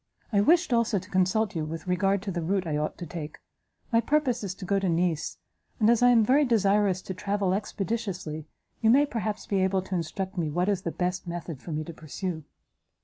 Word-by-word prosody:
I 200 - +5
wished, 330 - +4
also 230 -2 +2
to 185 +1 -6
consult 190 +2 +2
you 160 - -1
with 160 +2 -5
regard 195 +2 +1
to 200 - -3
the 175 -1 -2
route 190 +3 0
I 155 -3 -1
ought 150 +1 -2
to 175 - -6
take. 155 -2 -7 0.5
My 230 0 +4
purpose 265 -5 +1
is 190 -2 -4
to 190 - -8
go 195 +2 +2
to 195 -2 0
Nice, 170 -2 0 0.4
and 220 0 +5
as 235 0 +3
I 245 - +7
am 230 -3 +5
very 275 +6 +4
desirous 205 -5 +2
to 190 - -5
travel 200 0 0
expeditiously, 195 -6 -3 0.3
you 220 - +4
may 275 +5 +6
perhaps 215 -6 -3
be 195 -2 0
able 190 0 +1
to 190 - -7
instruct 185 +3 -3
me 160 -3 0
what 175 +6 0
is 195 -3 +1
the 170 - -3
best 180 +1 -2
method 170 -4 -5
for 170 - -7
me 155 0 -2
to 170 - -8
pursue." 160 +2 -5
190 Hz, 220 wpm, -27 LUFS, 175-215 Hz, 0.5 s, I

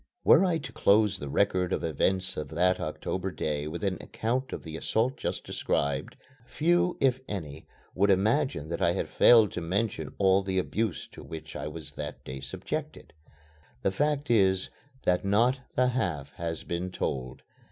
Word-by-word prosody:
Were - - +7
I 180 -3 +2
to 155 - -7
close 100 -1 +3
the 70 - -5
record 90 +2 +1
of - - -1
events 95 +4 0
of 75 - -4
that 90 +4 +2
October 90 +4 -3
day 75 -4 -2
with 85 +5 -5
an 95 -2 0
account 125 +4 -2
of - - -5
the 80 -1 -7
assault 115 +10 0
just - - -3
described, 70 -1 -2 0.3
few, 175 +5 +2
if 130 -1 +3
any, 80 -7 -6 0.3
would 100 +2 +2
imagine 105 - +2
that 85 - -3
I - - +3
had - - -2
failed 115 -5 +6
to 90 - -4
mention 100 +7 -2
all 95 0 +4
the 95 -1 -2
abuse 105 0 -1
to - - -11
which 80 -1 -9
I 75 - -4
was 75 -1 -7
that - - -7
day 65 +1 -6
subjected. 65 - -6 0.7
The 95 - +2
fact 145 +5 0
is 95 -4 +3 0.3
that 90 +2 +2
not 115 +7 +3 0.2
the 125 0 +3
half 90 - -2
has 85 -1 -4
been 85 +2 -3
told. 65 -7 -4
95 Hz, 175 wpm, -28 LUFS, 80-115 Hz, 0.7 s, Were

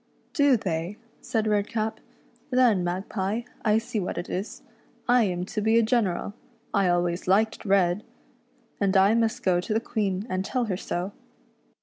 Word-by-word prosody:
" - - -37
" - - -41
Do 285 -6 +4
they," 180 -1 -3 0.2
said 225 -3 -1
Redcap 215 +1 0 0.2
— - - -33
" - - -34
Then, 245 -8 +4
Magpie, 190 +4 -2 0.2
I 215 -1 +4
see 230 0 -2
what 180 - -3
it - - -4
is, 190 +4 -4 0.4
I 245 -1 +5
am 180 -2 -2
to 215 +2 -3
be 220 +2 +3
a 230 - +5
general 215 -4 0 0.2
— 230 - -37
I 200 -2 +3
always 175 0 0
liked 215 +4 +2
red 190 -1 +3 0.4
— 245 -2 -38
and 195 0 +3
I 195 +3 +5
must 230 0 +1
go 180 -2 +3
to 215 - -3
the - - +3
Queen 205 -4 -2
and 185 -4 -1
tell 250 +4 -1
her 200 -4 -1
so." 180 +1 -3
210 Hz, 195 wpm, -26 LUFS, 185-230 Hz, 0.4 s, I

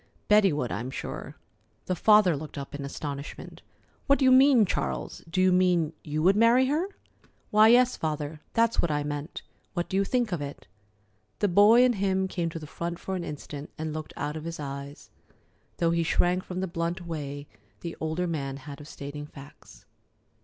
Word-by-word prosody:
Betty 210 -2 +5
would, 145 -5 -2
I'm 115 +5 -3
sure." - - -6 0.5
The 185 - -1
father 210 -3 +5
looked 150 +1 -8
up 140 -1 -7
in 145 -1 -5
astonishment. 140 0 -7 0.5
"What 280 -1 +5
do 270 - +1
you 260 - +6
mean, 260 -3 +6
Charles? - - -3
Do 185 - -1
you 185 0 +5
mean 180 -3 +2
you 155 +1 -2
would 190 +3 +5
marry 230 +4 +5
her?" 305 +7 0 0.6
"Why, 215 +1 +7
yes, 245 +2 +5
Father, 150 -1 -3
that's 230 0 +2
what 170 - 0
I 145 -1 0
meant. 145 +2 -5 0.3
What 175 -1 -2
do 190 - 0
you 195 - +3
think 240 +1 0
of 170 -4 -2
it?" 140 0 -7 0.7
The 205 - +1
boy 205 +6 +6
in 250 - +3
him 190 -2 0
came 175 -3 -2
to 165 - -7
the 155 - -7
front 170 +3 -5
for 190 - -4
an 180 - -3
instant 150 -1 -7
and 155 -1 -4
looked 155 0 -6
out 145 +1 -3
of 155 0 -6
his 165 -1 -5
eyes, 140 0 -7 0.7
though 170 -1 +2
he 170 0 +1
shrank 175 +2 +1
from 185 0 -5
the 190 - -1
blunt 170 +1 -3
way 145 -3 -5 0.3
the 170 -1 -5
older 160 +3 -1
man 140 -5 -3
had 140 +1 -10
of 145 - -11
stating 145 0 -7
facts. 140 -1 -15
170 Hz, 195 wpm, -27 LUFS, 150-195 Hz, 0.7 s, Why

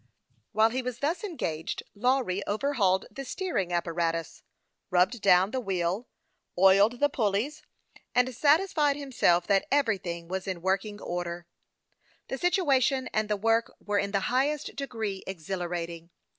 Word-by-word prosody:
While 220 +2 +4
he 260 +2 -1
was 250 -2 -4
thus 300 +9 -1
engaged, 165 - -3
Lawry 240 -4 +1
overhauled 205 -5 +1
the 275 - -6
steering 270 - -2
apparatus, 165 -2 -1 0.5
rubbed 185 +6 +2
down 190 0 +5
the 260 - -1
wheel, 190 0 -2 0.5
oiled 200 +6 +5
the 290 - +4
pulleys, 260 +2 -1 0.5
and 250 +1 +3
satisfied 300 - +3
himself 245 -11 +2
that 195 0 +2
every 260 -8 +2
thing 170 -1 -6
was 190 +1 -4
in 180 -3 -4
working 195 +2 -1
order. 175 -1 -4 0.8
The 265 - -3
situation 275 -7 +2
and 215 0 0
the 210 - +1
work 225 +2 +1
were 205 -1 -1
in 200 - -1
the 200 -1 0
highest 275 +7 0
degree 225 -8 -4
exhilarating. 170 -2 -4
210 Hz, 140 wpm, -28 LUFS, 180-265 Hz, 0.8 s, down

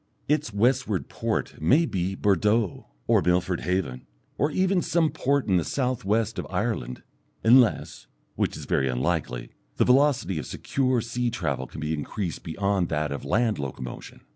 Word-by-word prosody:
Its 150 -3 +1
westward 110 - +1
port - - -3
may 140 - +4
be 95 - -2
Bordeaux 105 +1 +1 0.2
or - - +4
Milford 90 0 +1
Haven, 90 -8 -2 0.3
or 145 - +1
even 185 +3 +1
some 165 -2 +1
port 140 +1 0
in 95 -3 +3
the 85 - +1
south 130 - -1
west 110 +2 0
of - - -5
Ireland 105 - -2 0.4
unless, 120 0 +3 0.3
which - - -1
is - - -8
very 65 -1 +1
unlikely, 65 -2 -2 0.3
the - - +3
velocity 130 - +3
of - - -6
secure 130 -3 0
sea 120 +1 -2
travel 70 - -2
can 75 - -9
be 75 +1 -1
increased 85 +4 -4
beyond 95 +1 0
that 75 -1 -1
of 70 - -5
land 110 +6 +1
locomotion. 65 -3 -7
100 Hz, 160 wpm, -26 LUFS, 80-125 Hz, 0.4 s, may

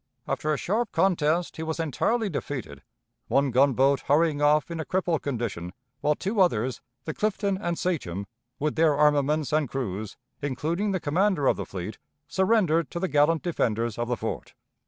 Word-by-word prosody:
After 155 - -1
a 150 - +1
sharp 215 +7 -1
contest 170 -2 +1
he - - -4
was 160 0 -3
entirely 210 - 0
defeated, 130 - -5 0.5
one 135 -1 +2
gunboat 135 +2 +4
hurrying 150 0 +2
off 150 +2 +3
in 165 - -4
a - - -1
crippled 175 -2 0
condition, 110 -10 -3 0.3
while 150 +1 +2
two 200 +5 0
others, 130 - +1 0.2
the 155 - -3
Clifton 200 0 0
and 170 -3 -2
Sachem, 100 - -2 0.3
with 150 +1 -1
their 160 -2 +3
armaments 150 -1 +2
and 150 -4 +2
crews, 110 -5 -4 0.2
including 160 +8 -1
the 190 -2 0
commander 170 0 +1
of - - +4
the - - -5
fleet, 95 +2 -6 0.3
surrendered 180 - +2
to 170 - -4
the 190 - 0
gallant 150 +2 +3
defenders 115 - -1
of 120 - -1
the 125 -1 -1
fort. - - -5
150 Hz, 170 wpm, -26 LUFS, 135-175 Hz, 0.5 s, gunboat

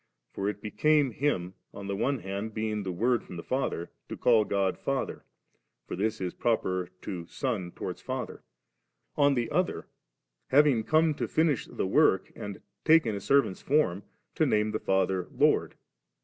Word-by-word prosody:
For 100 +1 -1
it 105 -1 -6
became 145 +5 +2
Him, 95 -10 -1 0.2
on 100 - -7
the 100 0 -2
one 130 +4 0
hand 100 +3 -5
being 110 -1 -1
the 95 -2 -3
Word 120 +7 +1
from 90 - -9
the 85 - -6
Father, 125 -10 -2 0.2
to - - -5
call 115 -3 +4
God 100 -2 0
Father: 135 -1 -3 0.6
for - - -5
this 110 +4 -1
is 90 -2 -3
proper 95 -6 0
to 90 -4 -5
son 110 -9 -2
towards - - -6
father; - - -5 0.7
on 145 -1 +4
the 120 -2 -1
other, - - 0 0.6
having 135 -4 +4
come 155 +5 +3
to - - -3
finish 155 -5 +1
the - - -3
work, 95 -2 +3
and 100 -2 -7 0.2
taken 155 -9 +5
a 100 - -3
servants 135 -2 +2
form, 135 - +2 0.3
to - - +2
name 105 0 +2
the 110 - -2
Father 95 -1 +1
Lord. - - +2
110 Hz, 165 wpm, -29 LUFS, 95-135 Hz, 0.7 s, taken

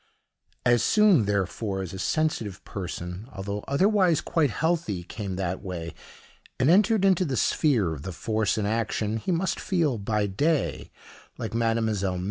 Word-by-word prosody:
As 120 -1 +4
soon, 210 - +4
therefore, 100 0 -1
as 90 - -7
a 95 - -6
sensitive 115 - -1
person, 90 +1 -6
although 100 0 -5
otherwise 185 +1 +3
quite 160 -3 +1
healthy, 160 - -1
came 95 +1 -5
that 95 -1 -3
way, 85 -4 -5 0.7
and 130 +5 +4
entered 210 +2 +4
into 190 -2 +4
the 135 -7 -2
sphere 115 - +2
of 70 - -7
the 95 - -5
force 110 +3 -1
in 105 - 0
action, 110 0 -1
he 115 - -3
must 180 +2 0
feel, 160 - 0
by 105 +1 0
day, 145 +11 0 0.5
like 110 -3 -4
Mdlle. 110 -5 0
110 Hz, 150 wpm, -26 LUFS, 95-155 Hz, 0.7 s, As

